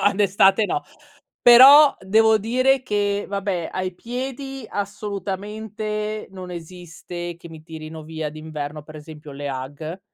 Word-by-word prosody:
d'estate 200 +1 +4
no. 365 - -2 0.6
Però, 275 +5 +9
devo 220 +3 +3
dire 255 +5 +2
che, 205 -4 -1
vabbè, 195 -4 -2
ai 185 0 -3
piedi 265 +4 -6
assolutamente 210 +1 -5
non 185 -1 -9
esiste 175 0 -8
che 170 0 -13
mi 160 -1 -11
tirino 160 0 -9
via 160 -1 -5
d'inverno, 155 -1 -7
per 155 +1 -13
esempio, 150 0 -11
le 145 +1 -6
Ugg, 145 +6 -6
195 Hz, 125 wpm, -22 LUFS, 160-215 Hz, 0.6 s, Però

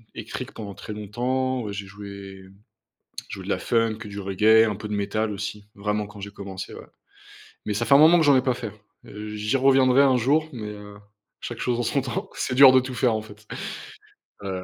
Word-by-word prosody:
électrique - - -6
pendant 100 -3 -7
très 110 - -8
longtemps, 125 +3 -2
heu, - - -4
j'ai 100 -1 -5
joué, 100 -1 -10 0.9
joué - - -7
de - - -7
la - - 0
funk, 115 -2 +1
du 100 0 -7
reggae, 105 +4 +4
un 105 - -3
peu 105 +2 -7
de 105 - -3
métal 105 +2 -1
aussi, 105 0 -5
vraiment 105 +1 -2
quand 105 0 -13
j'ai 100 0 -7
commencé 100 -2 -8
ouais. - - -10 0.8
Mais 105 - -1
ça 115 +3 0
fait 140 - +5
un - - +8
moment 165 +3 +7
que 160 - +3
j'en 145 -2 +6
ai 130 - +3
pas 130 -2 +1
fait. 115 -4 -6 0.3
J'y 105 +3 -3
reviendrai 135 0 +5
un 130 -2 +4
jour, 150 +6 +2
mais 110 -4 -6
heu, 105 -1 -10 0.4
chaque 120 - -6
chose 120 -1 0
en - - 0
son 140 +4 0
temps. 130 -3 -4
C'est 125 - -2
dur 135 0 +9
de 130 - +6
tout 130 0 -6
faire, 120 -1 +2
en 110 - -2
fait, 105 0 -15 1.0
ouais. 95 -2 -4
110 Hz, 215 wpm, -24 LUFS, 105-130 Hz, 1.0 s, dur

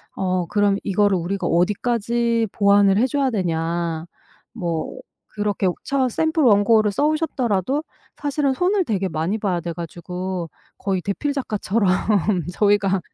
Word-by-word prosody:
"어 185 -2 -1
그럼 205 +1 +2
이거를 200 0 +2
우리가 180 +3 -3
어디까지 230 +5 +1
보완을 200 -1 +4
해 235 - +4
줘야 275 +1 0
되냐." 170 -4 -2 0.5
뭐 170 -8 -3 0.3
그렇게 205 -2 -1 0.2
처음 265 -2 +1
샘플 320 +6 0
원고를 215 -1 +4
써 285 +9 0
오셨더라도 280 - 0 0.3
사실은 285 -1 0
손을 375 +4 +2
되게 200 - -1
많이 165 +6 -1
봐야 190 -5 -1
돼 170 0 -4
가지고 175 +1 -5 0.3
거의 190 -2 -1
대필 285 +9 -2
작가처럼 215 -5 -1 0.7
저희가 200 -1 +2
205 Hz, 290 characters per minute, -22 LUFS, 185-240 Hz, 0.7 s, 보완을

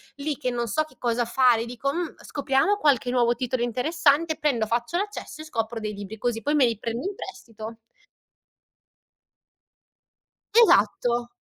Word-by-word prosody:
lì 280 - -9
che 255 -3 -2
non 240 -1 -2
so 270 +9 +1
che 310 - -20
cosa 240 0 0
fare 240 -1 +4
e - - -3
dico: 245 +4 -3
"Mh, 345 -2 -3
scopriamo 285 +8 +1
qualche 270 - +2
nuovo 240 -1 +3
titolo 250 0 -2
interessante" 300 +6 +1
prendo 250 -7 +1
faccio 235 +9 -1
l'accesso 405 -5 -5
e - - -7
scopro 230 -5 -3
dei 215 -1 -4
libri 205 +1 -8
così 225 0 -1
poi 295 +4 0
me 280 - +5
li 230 -3 -1
prendo 230 +8 -4
in 405 - -3
prestito. 225 - -9 2.9
Esatto. 235 - +3
245 Hz, 155 wpm, -25 LUFS, 230-295 Hz, 2.9 s, me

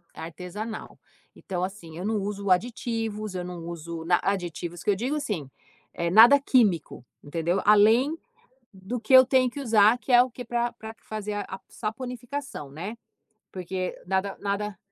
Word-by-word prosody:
artesanal. 180 +7 -7 0.4
Então 180 -2 -4
assim 180 -4 -6
eu 185 - -5
não 220 0 0
uso 200 0 -4
aditivos, 220 0 -1
eu 180 -1 -3
não 180 -1 -7
uso 170 -1 -6
n 175 - 0
aditivos 175 -3 -3
que - - -1
eu - - +1
digo 255 +9 -2
assim, 185 - -3 0.4
eh, 170 -1 -1
nada 235 +7 +8
químico, 205 - +1 0.2
entendeu? 170 +5 -1
Além 225 +9 +5 0.6
do 195 +6 -5
que 230 +4 -1
eu 260 0 +10
tenho 255 -1 +3
que 285 - -7
usar 220 -1 +5
que 260 - -5
é 245 0 +8
o 255 - -6
que 245 +1 -8
pra 240 0 -1
pra 220 -1 -9
q - - -34
fazer 210 -1 -4
a 190 - -7
saponificação, 245 - -6
né. 195 +10 -6 0.6
Porque 185 0 -4
nada, 190 +1 -1
nada 205 0 -3
205 Hz, 165 wpm, -26 LUFS, 180-235 Hz, 0.6 s, eu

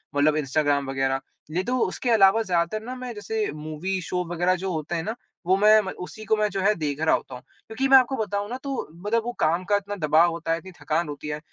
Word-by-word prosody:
मतलब 145 +1 +3
इंस्टाग्राम 145 -1 +1
वग़ैरह, 135 0 0 0.3
नहीं 180 +4 0
तो 250 +5 -1
उसके 240 +4 -1
अलावा 205 0 +5
ज़्यादातर 180 +3 0
ना 255 +2 -5
मैं 250 -1 -6
जैसे 215 -1 -2
मूवी 155 +5 -3
शो 180 +1 -2
वग़ैरह 175 +2 +2
जो 190 +1 -3
होते 155 +2 -3
हैं 165 - -2
न, 220 - -3 0.3
वो 185 +2 +4
मैं 215 +2 +6
उसी 190 +2 -7
को 220 - +3
मैं 210 - +2
जो 195 0 -2
है 210 +2 +4
देख 150 -4 -3
रहा 160 - +4
होता 130 - -6
हूँ। 125 - -10 0.3
क्योंकि 260 +5 -1
मैं 270 - +9
आपको 260 +1 +3
बताऊँ 205 -1 -2
ना 250 - -4
वो 205 - -5
देखो 230 +1 +1
काम 165 +3 +2
का 205 +1 +2
इतना 205 0 -2
दबाव 165 0 +4
होता 165 0 -3
है, 165 - +2
इतनी 190 +2 -12
थकान 160 +2 0
होती 145 +1 -7
है 150 0 -3
185 Hz, 240 wpm, -25 LUFS, 155-215 Hz, 0.3 s, मैं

